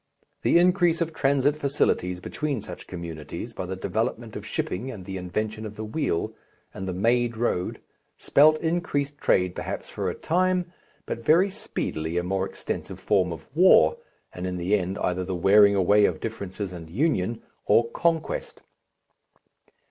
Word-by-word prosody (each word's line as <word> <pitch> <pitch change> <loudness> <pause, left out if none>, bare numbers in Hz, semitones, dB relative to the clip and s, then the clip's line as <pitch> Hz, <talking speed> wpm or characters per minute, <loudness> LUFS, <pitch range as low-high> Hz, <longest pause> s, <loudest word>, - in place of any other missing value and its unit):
The - - +4
increase 175 -1 +4
of 165 -1 -1
transit 140 -1 +2
facilities 135 -11 0
between 140 +7 -3
such 105 - -9
communities, 85 +4 -7
by 95 - -5
the 95 - -3
development 95 - -2
of - - -5
shipping 110 +9 -3
and 100 -8 -8
the 95 - -6
invention 105 +4 -3
of 105 -1 -7
the 110 - -5
wheel 110 - -1 0.4
and 95 - -6
the - - -1
made 115 +4 +1
road, 110 -6 -1 0.4
spelt 155 +2 +5
increased 145 -4 -1
trade 90 -1 +2
perhaps - - -5
for - - -2
a - - -4
time, 180 +1 0 0.3
but 115 - -5
very 175 - +4
speedily 80 - -4
a 90 - +1
more 95 +1 -1
extensive - - -5
form 90 -2 +2
of 80 - -7
war, 80 - +6 0.4
and 90 +1 -4
in 90 0 -3
the 90 +4 +1
end 95 0 -2
either 90 +1 -1
the 95 0 -3
wearing 100 +3 +6
away 100 +2 +5
of - - 0
differences 100 -3 -5
and 85 -2 -9
union, 115 - 0 0.2
or 115 - +4
conquest. 165 -2 -1
105 Hz, 160 wpm, -26 LUFS, 90-145 Hz, 0.4 s, war